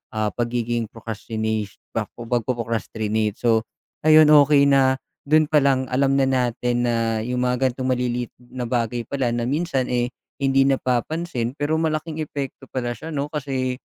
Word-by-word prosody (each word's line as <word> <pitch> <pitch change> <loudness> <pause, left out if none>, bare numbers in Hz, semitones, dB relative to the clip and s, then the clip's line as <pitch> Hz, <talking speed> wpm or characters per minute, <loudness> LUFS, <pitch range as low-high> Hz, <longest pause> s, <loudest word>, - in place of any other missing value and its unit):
ah, 110 -1 0
pagiging 120 -1 -1
procrastinesh 110 -1 -4 0.2
bak - - -1
o 120 - -6
pagpo-procrastinate. 115 -3 -1
So, 115 -2 +2 0.4
ayun, 155 0 +8
okey 145 -1 +6
na, 135 -1 +4 0.3
do'n 155 +1 +5
pa 150 - +6
lang, 130 -1 +2
alam 135 +1 +3
na 135 - +4
natin 125 -1 0
na, 115 -1 0
yung 125 +1 -1
mga 125 +1 +2
gano'ng 130 +1 -3
maliliit 125 -1 -2
na 125 0 -6
bagay 120 0 -1
pala, 135 -3 -1
na 120 0 -1
minsan, 140 -3 0
eh, 120 0 +1 0.3
hindi 135 0 +3
napapansin, 130 0 -1
pero 150 +2 0
malaking 155 0 -2
epekto 140 -2 -6
pala 120 -2 -2
siya, 160 +4 -7
'no, 145 0 -2
kasi, 130 -4 -2
125 Hz, 155 wpm, -23 LUFS, 115-140 Hz, 0.4 s, ayun